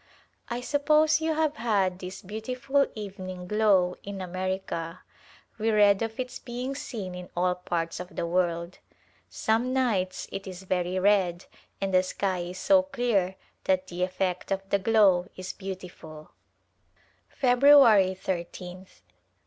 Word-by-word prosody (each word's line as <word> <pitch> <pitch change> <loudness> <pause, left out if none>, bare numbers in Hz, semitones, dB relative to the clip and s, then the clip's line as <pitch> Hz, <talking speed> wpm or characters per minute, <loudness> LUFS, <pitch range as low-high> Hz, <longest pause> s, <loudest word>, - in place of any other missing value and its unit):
I 240 +1 -3
suppose 305 +3 +3
you 320 0 0
have 310 -1 0
had 195 -6 +1
this 185 +2 -8
beautiful 250 +7 -1
evening 185 -3 -7
glow 195 -4 +3
in 200 -1 -7
America. 185 -2 -4 0.6
We 220 +1 +1
read 205 -2 +4
of 225 +1 -3
its 250 0 -4
being 250 +2 -5
seen 215 -9 -6
in 180 0 -8
all 180 +1 +2
parts 170 -2 -3
of 180 -1 -8
the - - -2
world. 170 0 -1 0.5
Some 230 +4 0
nights 215 -9 0
it 195 0 -6
is 185 0 -8
very 180 -1 -1
red 185 -3 +2 0.3
and 195 -1 -2
the 185 - +6
sky 185 0 -2
is 175 +1 -5
so 285 +8 +4
clear 240 -9 0 0.3
that 185 0 +2
the 175 0 -5
effect 185 0 -1
of 195 0 -2
the 200 - +3
glow 195 -4 +4
is 185 0 -6
beautiful. 180 -5 -9 1.0
February 245 -7 +6
Ijth. 180 - -6
190 Hz, 140 wpm, -27 LUFS, 180-230 Hz, 1.0 s, the